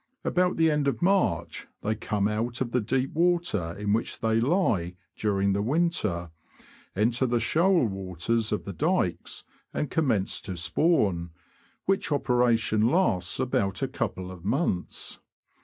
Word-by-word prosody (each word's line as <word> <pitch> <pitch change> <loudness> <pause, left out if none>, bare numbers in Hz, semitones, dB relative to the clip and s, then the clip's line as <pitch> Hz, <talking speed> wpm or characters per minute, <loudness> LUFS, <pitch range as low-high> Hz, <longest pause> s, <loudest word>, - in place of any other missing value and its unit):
About 180 0 +1
the 165 -1 +4
end 150 -1 +1
of 140 +3 -1
March 195 +1 +1
they 110 - 0
come 105 -2 -1
out 115 +3 -2
of 125 -3 -2
the 125 - +1
deep 130 +5 -1
water 170 - +1
in 105 0 0
which 115 - -1
they 110 0 +1
lie 115 - +1 0.2
during 100 -2 +1
the 100 - 0
winter, 110 - 0 0.6
enter 115 +5 +2
the 120 0 +1
shoal 170 - +3
waters 95 +3 -1
of 105 - -2
the 100 - -5
dykes, 150 - -1 0.3
and 150 - -2
commence 125 -12 +1
to 95 -3 -6
spawn, 85 - +1 0.6
which 195 -4 0
operation 120 -5 +2
lasts 115 - +1
about 100 -8 0
a - - +1
couple 95 0 -4
of 90 -2 -11
months. 110 - -2
115 Hz, 145 wpm, -27 LUFS, 95-150 Hz, 0.6 s, the